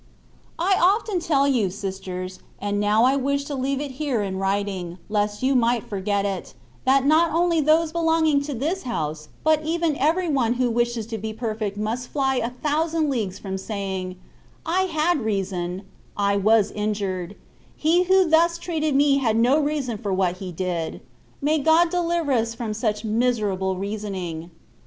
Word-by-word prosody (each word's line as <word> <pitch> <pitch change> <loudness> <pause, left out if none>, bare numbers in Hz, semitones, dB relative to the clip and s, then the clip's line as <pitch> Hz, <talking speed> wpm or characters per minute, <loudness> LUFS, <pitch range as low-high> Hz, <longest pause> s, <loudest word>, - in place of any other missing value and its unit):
I 375 +3 +2
OFTEN 395 +1 +2
tell 280 -4 +2
you, 240 -8 +2
sisters, 185 -1 -6 0.2
and 205 0 -1
now 210 +2 +3
I 260 +2 +4
wish 280 +1 0
to 285 - -6
leave 270 0 -1
it 285 -1 -4
here 260 -8 0
in 190 -1 -3
writing, 195 -3 -2
lest 210 +1 -1
you 270 +1 +3
might 240 -2 +2
forget 200 0 -1
it, 195 -2 -4 0.3
that 270 +1 +4
not 315 +3 +4
only 335 0 +2
those 310 +2 +3
belonging 320 -3 +2
to 290 -2 -4
this 320 +10 -1
house, 155 -10 -4
but 310 0 +3
even 325 -1 0
every 330 +6 +1
one 260 -7 +2
who 250 -1 +1
wishes 235 -1 0
to 225 0 -5
be 220 +1 -4
perfect 215 -3 -3
must 225 +4 -2
fly 270 -2 0
a 235 -1 0
thousand 305 +4 0
leagues 205 -7 -2
from 190 -1 -5
saying,* 190 -3 -4 0.3
" - - -31
I 370 +4 +1
had 330 -1 +1
rea 210 -3 0
son 180 0 -4 0.2
— - - -31
^I 200 0 +1
was 215 0 +4
injured 200 -3 -3 0.2
— - - -31
^he 350 +3 +4
who 380 -1 +5
thus 335 +1 +4
treated 315 -4 -1
me 280 0 +4
had 225 -4 +1
no 250 +6 +4
reason 285 -7 -1
for 205 - -3
what 185 -1 +1
he 185 -1 -6
did: 175 -2 -2
^^ - - -10 0.4
may 305 +2 +2
God 320 +3 +4
deliver 340 -4 0
us 230 -2 +1
from 230 -2 -3
such 215 0 -2
miserable 210 -5 0
reasoning. 190 -5 -4
235 Hz, 180 wpm, -23 LUFS, 200-305 Hz, 0.4 s, who